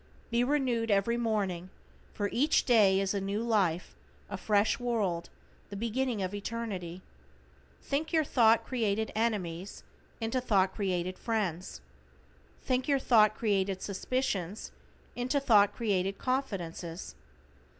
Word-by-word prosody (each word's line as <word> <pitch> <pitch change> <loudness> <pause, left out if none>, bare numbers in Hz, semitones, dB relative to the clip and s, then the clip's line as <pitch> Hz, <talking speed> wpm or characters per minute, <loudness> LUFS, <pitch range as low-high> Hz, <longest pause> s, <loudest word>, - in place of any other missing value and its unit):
Be 235 +1 +3
renewed 250 -4 0
every 205 +3 +2
morning, 200 -6 -1 0.4
for 205 - -2
each 290 +6 +2
day 205 -6 +5
is 195 0 0
a 200 - -1
new 200 +3 -2
life, 195 -7 0 0.4
a - - -2
fresh 210 0 +1
world, 210 -9 -1 0.4
the 200 - -7
beginning 230 0 -1
of 185 +1 -3
eternity. 200 -5 -5 0.8
Think 290 +3 -2
your 320 -2 +3
thought 230 -5 +4
created 220 -3 -1
enemies 200 -5 -2 0.4
into 230 +3 -1
thought 195 -6 +2
created 185 -3 -2
friends. 185 - -2 0.8
Think 255 0 0
your 280 -2 +3
thought 215 -5 +4
created 195 -3 0
suspicions, 200 -2 -2 0.4
into 250 +4 0
thought 215 -7 +5
created 195 -4 -1
confidences. 185 -10 -3
210 Hz, 120 wpm, -30 LUFS, 190-240 Hz, 0.8 s, day